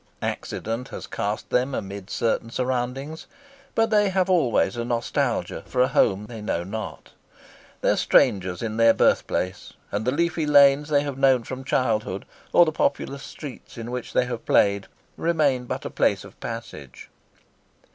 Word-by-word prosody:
Accident 115 +4 -3
has - - -7
cast 105 +1 -4
them 130 +2 +1
amid 100 0 -6
certain 115 0 -1
surroundings, 130 +5 -3 0.5
but 225 0 +2
they 210 -2 +4
have 190 0 +1
always 130 - +2
a 120 - -2
nostalgia 120 0 -1
for 125 - -3
a 125 - +5
home 100 -5 +2
they 110 0 -8
know 85 -5 -2
not. 110 +4 -7 0.7
They - - +2
are - - +2
strangers 95 -1 +2
in 110 -1 -3
their 115 0 +5
birthplace, 90 0 0 0.2
and 105 +2 -1
the 125 - +1
leafy 165 +1 0
lanes 145 0 +6
they 145 -1 +3
have 140 -2 -5
known 135 -3 +4
from 130 +2 -6
childhood 110 -7 0 0.3
or 175 - +7
the 155 - 0
populous 140 -2 -1
streets 140 -4 -10
in 115 +1 -6
which 125 -1 -5
they - - +3
have 120 -2 -5
played, 100 -1 +3 0.3
remain 150 -7 +1
but - - -5
a - - -4
place - - +1
of - - -14
passage. 115 - -8
125 Hz, 165 wpm, -24 LUFS, 110-140 Hz, 0.7 s, or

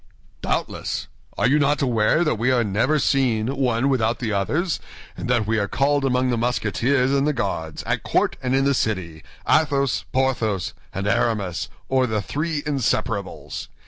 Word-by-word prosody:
"Doubtless! - - -2 0.3
Are 115 - +3
you 145 +4 +3
not 145 0 +2
aware 120 +5 +3
that 155 - +1
we 120 +3 +2
are 125 -2 +3
never 110 +9 +1
seen 130 -4 +1
one 130 -1 +1
without 120 -4 +1
the 115 -4 -2
others, 155 - 0 0.4
and - - -5
that 120 -4 +2
we 110 +1 +1
are 100 - 0
called 140 +3 +1
among 130 -1 +1
the 120 - 0
Musketeers 125 +3 +1
and 140 +1 +2
the 150 - +2
Guards, 90 - -3
at - - -1
court - - +1
and 130 0 0
in 135 0 +2
the 140 - +3
city, 90 - -2 0.3
Athos, 140 -4 +2
Porthos, 120 -8 0 0.2
and 95 +1 -4
Aramis, 105 -5 0 0.2
or 130 -1 +2
the 110 -2 0
Three 150 - -2
Inseparables? 115 -7 -2
125 Hz, 170 wpm, -23 LUFS, 110-140 Hz, 0.4 s, Are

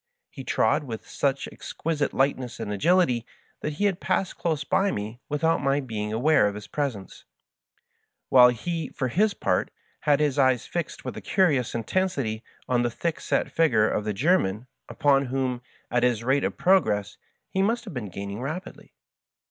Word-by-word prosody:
He 135 - -8
trod 110 +1 +2
with 115 -5 -7
such 140 -1 -1
exquisite 150 -3 -3
lightness 130 -2 0
and 105 - -3
agility 145 - +3 0.4
that 150 - -3
he 200 +8 -1
had 195 -3 +1
passed 190 - -1
dose 155 -4 0
by 195 +6 +2
me 110 - -4
without 160 +2 +1
my 140 0 +2
being 110 -6 -4
aware 125 +1 +3
of 100 - -3
his 105 0 -8
presence, 125 -8 -4 1.1
while 125 -1 +8
he, 160 +5 -3
for 130 - -3
his 205 - +2
part, - - 0 0.3
had 145 -2 +2
his 150 -2 +1
eyes 130 -3 +3
fixed 170 -2 -4
with - - -4
a - - -6
curious 150 - +1
intensity 120 - -1 0.2
on 125 -1 +2
the 120 - +1
thick 165 +7 -3
set - - -1
figure 115 -10 +3
of 105 - -1
the 105 - -1
German, 115 - +1 0.2
upon 140 -1 +3
whom, 130 -1 -2 0.3
at 120 +1 +2
his 120 -2 +1
rate 135 +3 +2
of - - -2
prog 190 -4 +4
ress, 105 -1 -2 0.3
he 190 - +1
must 230 +4 0
have 200 - -8
been 115 -6 -5
gaining 100 +4 -6
rapidly. 155 +8 -7
135 Hz, 175 wpm, -26 LUFS, 115-165 Hz, 1.1 s, while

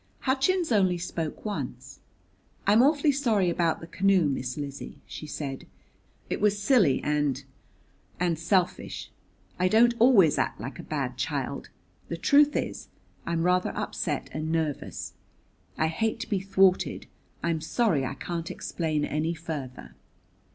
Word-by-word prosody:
Hutchins 285 +5 +1
only 190 -5 +3
spoke 170 -1 -5
once. 210 -1 -5 0.7
"I'm 210 +3 +5
awfully 290 +2 +4
sorry 225 -10 +2
about 170 -1 0
the - - -7
canoe, 190 0 +2
Miss 130 -2 -3
Lizzie," 140 -1 -6
she 155 - -8
said; 140 -3 -5 0.6
"it - - -3
was 205 -1 +3
silly 205 - +3
and 145 -2 0 0.8
and 170 -3 0
selfish. 180 +1 -1 0.5
I 185 - +3
don't 230 +5 +5
always 220 - +6
act - - -1
like - - -7
a - - -10
bad - - -2
child. - - -3 0.4
The - - -4
truth 290 0 +4
is, - - -3 0.4
I'm 170 -1 0
rather 180 +1 +1
upset - - -2
and 155 +1 -3
nervous. 160 -3 -2 0.6
I 155 - +2
hate 215 +8 -1
to - - -4
be 200 - +2
thwarted 190 -1 +2 0.4
I'm 165 -2 0
sorry 175 - +1
I 130 - -3
can't 170 -1 -4
explain 155 -3 -2
any 160 +3 -1
further." 150 -6 -7
175 Hz, 140 wpm, -27 LUFS, 155-215 Hz, 0.8 s, always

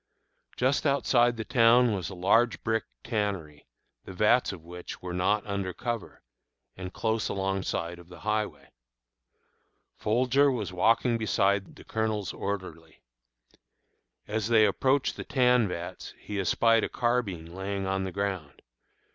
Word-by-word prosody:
Just 130 +4 +2
outside 120 -4 +3
the 110 - -4
town 120 -1 +5
was 95 -3 -3
a 95 - -8
large 105 +4 +2
brick 110 0 0 0.2
tannery, 100 - -3 0.4
the 95 - -9
vats 105 +6 +3
of 90 -5 -10
which 90 +1 -8
were 90 -1 -6
not 100 +4 +1
under 100 -2 -3
cover, 120 +1 -5 0.5
and 90 -1 -7
close 110 +1 -1
alongside 95 -3 -2
of 85 0 -15
the 90 -1 -12
highway. 105 -10 -2 1.2
Folger 130 +6 +3
was 105 -7 -3
walking 115 +5 +2
beside 100 -2 +1
the - - -13
Colonel's 110 -4 -2
orderly. 95 -5 -6 1.2
As 110 0 -1
they 110 -2 +5
approached 130 +7 +1
the - - -5
tan 125 -4 +3
vats 85 -1 -6
he 105 -1 -5
espied 115 +4 +3
a - - -1
carbine 100 -9 -1
lying 95 +1 -3
on 95 0 -1
the 95 - -3
ground. 95 -7 -4
100 Hz, 140 wpm, -28 LUFS, 95-115 Hz, 1.2 s, town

